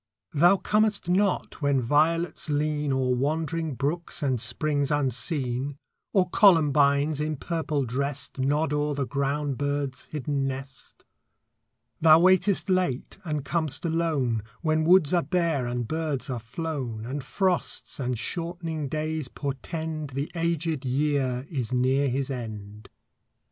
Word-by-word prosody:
Thou 175 +6 +5
comest 210 -2 +1
not 190 -2 +1
when 140 -2 +2
violets 160 +6 +1
lean 150 0 0
O'er 130 -1 +1
wandering 155 +3 -1
brooks 155 +5 -2
and 130 -5 +1
springs 140 +4 0
unseen, 135 0 -1 0.3
Or 185 -3 +3
columbines, 150 -6 +4
in 155 0 -1
purple 155 -2 -2
dressed, 140 +3 -3
Nod 145 +3 +1
o'er 150 0 0
the 140 -1 -1
ground 140 0 -1
bird's 145 -2 -2
hidden 145 -2 -2
nest. 135 0 -8 0.9
Thou 155 0 +7
waitest 185 +2 +3
late 185 -6 0
and 150 -5 -3
com'st 160 0 -1
alone, 155 -9 0 0.2
When 155 -1 +2
woods 175 -2 +5
are 175 - +4
bare 165 -8 0
and 120 -1 -2
birds 155 -3 -2
are 125 - -2
flown, 120 -3 -4
And 135 +3 -4
frosts 185 +2 -1
and 125 -2 -1
shortening 165 +2 -3
days 155 -1 -2
portend 155 +2 -5
The 140 +2 -2
aged 165 -3 -1
year 135 -1 0
is 130 -7 -3
near 130 +2 +2
his 135 +2 -1
end. 105 -4 -7
145 Hz, 130 wpm, -26 LUFS, 135-165 Hz, 0.9 s, Thou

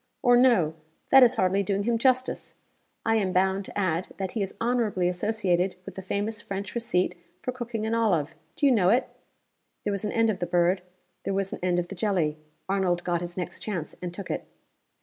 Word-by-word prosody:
Or 245 -2 +6
no 235 -11 +4 0.4
that 270 - +9
is 250 0 +6
hardly 190 -1 +2
doing 200 +1 0
him 230 +1 +1
justice. 255 +1 +1 0.5
I 225 0 +3
am 195 -4 0
bound 190 +1 +2
to - - -9
add 185 -3 0
that 190 -2 -3
he 220 - -2
is 195 - -3
honorably 230 -6 +1
associated 185 -1 0
with - - -7
the 190 - -7
famous 205 +3 -3
French 195 -1 -5
receipt 225 -7 0 0.3
for 255 - -1
cooking 240 -3 -4
an 220 - -1
olive. 180 -10 +1 0.2
Do - - +1
you 275 - +6
know 195 -7 +4
it?" 245 +5 +3 0.8
There 205 - -1
was 200 - -2
an 210 - -1
end 225 -1 +3
of 195 - -5
the 175 - -2
bird; 175 +1 +2 0.4
there 195 - -1
was 195 -1 -1
an - - -5
end 180 -1 +1
of 175 0 -1
the 200 - -6
jelly. 175 -6 0 0.3
Arnold 185 -3 +1
got 175 -1 0
his 175 0 -6
next 180 - -4
chance 180 -8 -4
and 180 -1 -4
took 190 +2 -6
it. - - -4
195 Hz, 210 wpm, -27 LUFS, 180-225 Hz, 0.8 s, that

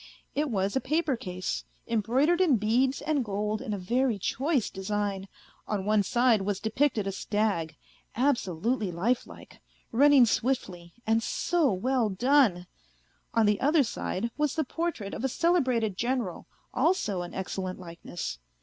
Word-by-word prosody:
It 295 0 0
was 200 -2 -1
a 265 - +1
paper 305 0 0
case, 185 -6 -4 0.2
embroidered 255 - +2
in 310 -10 +4
beads 245 +6 +1
and 300 -4 +1
gold 210 0 -2
in - - -5
a 205 - -1
very 235 +5 0
choice 265 - 0
design: 200 0 -3 0.4
on 200 -3 -2
one 210 0 +3
side 235 +1 +3
was 195 0 -2
depicted 220 0 0
a 195 - -1
stag, 195 -6 -1 0.4
absolutely 230 - 0
lifelike, 220 +9 -3 0.3
running 275 +1 +6
swiftly, 195 -9 -2
and 225 +1 +2
so 325 +4 +1
well 235 +4 +1
done! 220 -3 +3 0.7
On 225 -1 +4
the 210 0 +2
other 295 +2 +4
side 230 -1 -3
was 300 -2 0
the 315 - +1
portrait 305 -9 -3
of - - -5
a 265 - +1
celebrated 255 - +1
General, 240 -6 -2 0.3
also 255 - +1
an 175 - -7
excellent 185 0 -4
likeness. 170 - -6
225 Hz, 145 wpm, -28 LUFS, 195-265 Hz, 0.7 s, running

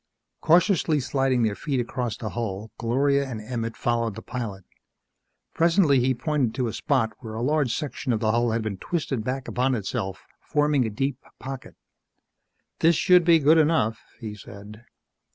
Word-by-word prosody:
Cautiously 170 -2 +3
sliding 135 -2 +1
their 110 -2 +1
feet 135 +5 -2
across 120 -1 -3
the 110 - -5
hull, 110 -2 -4
Gloria 140 +4 +1
and 115 -4 -5
Emmett 115 0 -4
followed 115 -3 0
the - - -8
pilot. 105 -7 -5 0.9
Presently 165 -4 +4
he 130 +1 +2
pointed 140 -4 -1
to 130 - 0
a 110 - -4
spot 130 -6 0
where 110 -3 -8
a 115 - -3
large 145 -2 +1
section 145 -3 -3
of 110 - +1
the 110 -1 +1
hull 120 +1 +2
had 115 0 -1
been 105 -3 -3
twisted 145 -9 -2
back 130 +3 -3
upon 130 +1 +1
itself, 100 -2 -4
forming 145 -3 +1
a - - -2
deep 135 +5 -2 0.2
pocket. 135 0 -8 1.0
"This 165 +1 +4
should 180 +3 +5
be 170 0 +6
good 160 +2 +5
enough," 150 -9 +2 0.2
he 110 -3 -6
said. 105 +2 -12
125 Hz, 170 wpm, -25 LUFS, 110-145 Hz, 1.0 s, be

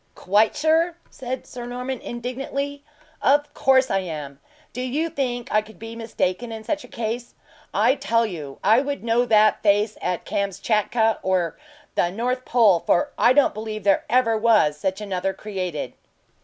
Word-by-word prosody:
"Quite 210 +3 +2
sure?" 325 +2 +2
said 260 0 -5
Sir 240 -1 -8
Norman, 250 +1 -4
indignantly. 270 +4 -4 0.4
"Of 290 +1 +2
course 265 -1 +3
I 195 - +2
am! 150 -6 -6 0.3
Do 250 - -4
you 290 +6 -1
think 245 -3 -2
I 215 - +4
could 215 -2 -15
be 225 +2 -8
mistaken 225 -1 -2
is 220 -1 -7
such 300 +3 -2
a - - -12
case? 235 +1 -4 0.4
I 225 +6 +3
tell 230 -4 +1
you 155 -9 -7
I 220 +5 +5
would 285 -2 -4
know 235 +1 +2
that 215 -2 +4
face 210 +1 +2
at 180 - -2
Kamschatka 215 +3 0
or, 185 -3 0 0.4
the 175 - +1
North 250 +6 -2
Pole; 220 -8 +4
for 290 - +1
I 240 - +4
don't 285 +1 +4
believe 215 -1 -5
there 200 -1 +3
ever 235 -2 +3
was 215 -9 +3
such 190 +6 -3
another 195 -2 -2
created." 185 -7 -4
225 Hz, 165 wpm, -23 LUFS, 200-255 Hz, 0.4 s, I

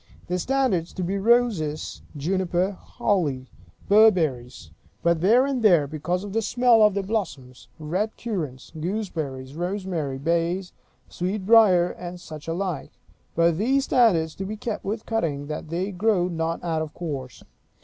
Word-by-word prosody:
The 180 +1 -2
standards 230 -8 0
to 185 - -4
be 195 +3 -1
roses; 200 -9 +1 0.2
juniper; 180 +4 0
holly; 175 - -2 0.4
berberries 155 - +3 0.3
(but 170 -1 +2
here 235 +8 +5
and 275 -3 -1
there, 175 -9 +5
because 160 +5 -3
of 205 -1 -7
the 225 - +1
smell 240 +1 +4
of 210 -2 +5
their 200 - 0
blossoms); 160 - -4
red 180 +8 -2
currants; 160 - -5
gooseberries; 155 -7 -4
rosemary; 175 -5 -3
bays; 170 +5 -1 0.3
sweetbriar; 190 -1 +3
and 180 0 -8
such 155 -3 -10
like. 175 -2 -3 0.4
But 170 0 +3
these 265 +6 +2
standards 180 - +3
to 195 - -4
be 215 +3 -5
kept 220 0 -4
with 215 +3 -4
cutting, 160 -11 -1
that 155 +1 -6
they 180 +5 -2
grow 190 -1 +1
not 165 -1 -3
out 165 -2 -1
of 155 -1 -6
course. 135 -8 -6
180 Hz, 145 wpm, -24 LUFS, 155-210 Hz, 0.4 s, here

